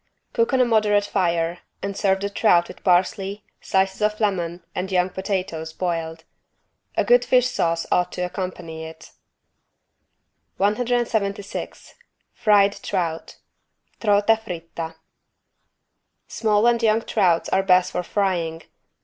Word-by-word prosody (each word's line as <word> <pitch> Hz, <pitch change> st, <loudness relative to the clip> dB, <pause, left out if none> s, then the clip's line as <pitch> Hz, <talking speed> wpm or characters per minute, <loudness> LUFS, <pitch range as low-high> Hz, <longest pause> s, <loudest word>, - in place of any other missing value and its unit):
Cook 230 Hz, +1 st, +1 dB
on 260 Hz, -, +2 dB
a 250 Hz, -, +5 dB
moderate 210 Hz, -3 st, +3 dB
fire 170 Hz, -3 st, 0 dB, 0.2 s
and 200 Hz, 0 st, -3 dB
serve 190 Hz, -1 st, +1 dB
the 200 Hz, -, -1 dB
trout 175 Hz, -5 st, +3 dB
with -, -, -13 dB
parsley, 190 Hz, +2 st, +1 dB, 0.2 s
slices 190 Hz, +1 st, 0 dB
of 210 Hz, 0 st, +1 dB
lemon 175 Hz, -5 st, -1 dB
and 185 Hz, +2 st, -4 dB
young 180 Hz, 0 st, +1 dB
potatoes 180 Hz, -5 st, -3 dB
boiled. 165 Hz, -2 st, -3 dB, 0.7 s
A -, -, +3 dB
good -, -, +5 dB
fish 250 Hz, -1 st, +3 dB
sauce 165 Hz, -8 st, -1 dB
ought 180 Hz, 0 st, +2 dB
to -, -, -4 dB
accompany 180 Hz, -3 st, -5 dB
it. 160 Hz, 0 st, -11 dB, 1.5 s
176 210 Hz, -2 st, -1 dB, 0.4 s
FRIED 205 Hz, -2 st, +3 dB
TROUT 170 Hz, -4 st, -3 dB, 0.6 s
(Trota 210 Hz, +1 st, +3 dB
fritta) 165 Hz, -4 st, -7 dB, 1.3 s
Small 215 Hz, -1 st, +1 dB
and 240 Hz, -1 st, +3 dB
young 225 Hz, 0 st, +2 dB
trouts 180 Hz, -6 st, +2 dB
are 190 Hz, -, +2 dB
best 185 Hz, -1 st, +3 dB
for -, -, -1 dB
frying. 175 Hz, -4 st, -1 dB
190 Hz, 125 wpm, -23 LUFS, 170-210 Hz, 1.5 s, a